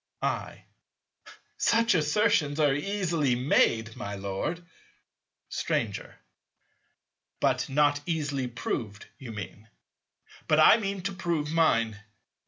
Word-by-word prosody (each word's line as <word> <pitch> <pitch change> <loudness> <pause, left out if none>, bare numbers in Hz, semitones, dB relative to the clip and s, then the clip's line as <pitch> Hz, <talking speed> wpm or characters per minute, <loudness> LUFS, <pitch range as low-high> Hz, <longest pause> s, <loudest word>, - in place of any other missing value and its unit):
I. - - -3 0.9
Such 230 -1 +3
assertions 160 -2 +2
are 145 -3 +4
easily 165 -4 0
made, 115 -3 +2
my 105 -5 -5
Lord. 100 - -4 0.8
Stranger. - - -3 1.2
But - - +1
not 145 +1 +2
easily 145 -6 -1
proved, 115 -3 -4
you 125 -4 -8
mean. 105 0 -8 0.8
But 155 - +3
I 155 - +8
mean 200 -4 -3
to 200 0 -2
prove 170 -4 -2
mine. 115 -10 +2
150 Hz, 100 wpm, -28 LUFS, 120-175 Hz, 1.2 s, I